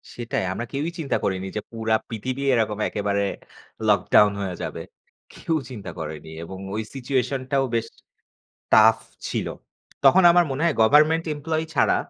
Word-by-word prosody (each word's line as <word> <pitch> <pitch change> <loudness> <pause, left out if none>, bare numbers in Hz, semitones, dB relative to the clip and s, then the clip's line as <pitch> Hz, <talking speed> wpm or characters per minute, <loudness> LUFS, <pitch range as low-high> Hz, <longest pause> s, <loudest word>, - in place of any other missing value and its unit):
সেটাই 120 -4 -2
আমরা 115 +5 -4
কেউই 145 +4 -2
চিন্তা 145 - -1
করিনি 95 0 -1
যে - - -1
পুরা 110 -1 0
পৃথিবী 125 +4 -4
এরকম 110 -3 0
একেবারে 100 -1 -1 0.6
লকডাউন 105 +1 +5
হয়ে 95 -2 -3
যাবে। - - -5 0.5
কেউ 165 - -2
চিন্তা 100 -8 -7
করেনি 80 0 -6
এবং 95 +3 -8 0.2
ওই 110 - -1
সিচুয়েশনটাও 135 +1 -1
বেশ 115 0 0 0.8
tough 110 +1 +6 0.3
ছিল। - - -2 0.6
তখন 190 0 +6
আমার 175 0 +5
মনে 135 +3 -3
হয় 165 - +3
গভারমেন্ট 155 +7 +5
এমপ্লয়ি 160 +2 -2
ছাড়া - - +4
115 Hz, 145 wpm, -24 LUFS, 105-140 Hz, 0.8 s, tough